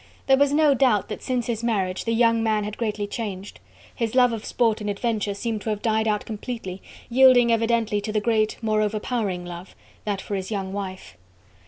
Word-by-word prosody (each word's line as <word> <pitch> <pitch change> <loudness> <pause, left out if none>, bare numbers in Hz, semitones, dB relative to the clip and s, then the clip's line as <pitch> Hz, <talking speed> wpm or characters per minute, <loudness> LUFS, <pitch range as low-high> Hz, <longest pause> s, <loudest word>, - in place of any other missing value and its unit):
There 270 - +5
was 280 0 +3
no 295 -1 +4
doubt 250 -7 +2
that - - -5
since 250 -3 -1
his 235 -1 -3
marriage 195 -6 -1
the 230 - 0
young 230 -1 +3
man 215 -2 +1
had 210 0 -5
greatly 215 -3 -1
changed. 205 -3 -6 0.3
His 230 -1 -3
love 250 -2 +5
of 220 -2 -5
sport 225 -3 +1
and 210 - -3
adventure 210 -1 -1
seemed 220 +1 -3
to 220 - -4
have 210 -1 -3
died 220 -1 +1
out 210 -1 0
completely, 215 -4 -6 0.3
yielding 250 -1 +6
evidently 230 -2 +1
to 215 +1 -4
the 215 - +1
great, 215 0 +1
more 215 -1 +2
overpowering 210 -3 -2
love, 175 +1 -9 0.3
that 205 -2 -2
for 205 - -6
his 190 -1 -3
young 195 -3 -3
wife. 190 - -6
220 Hz, 200 wpm, -24 LUFS, 205-235 Hz, 0.3 s, yielding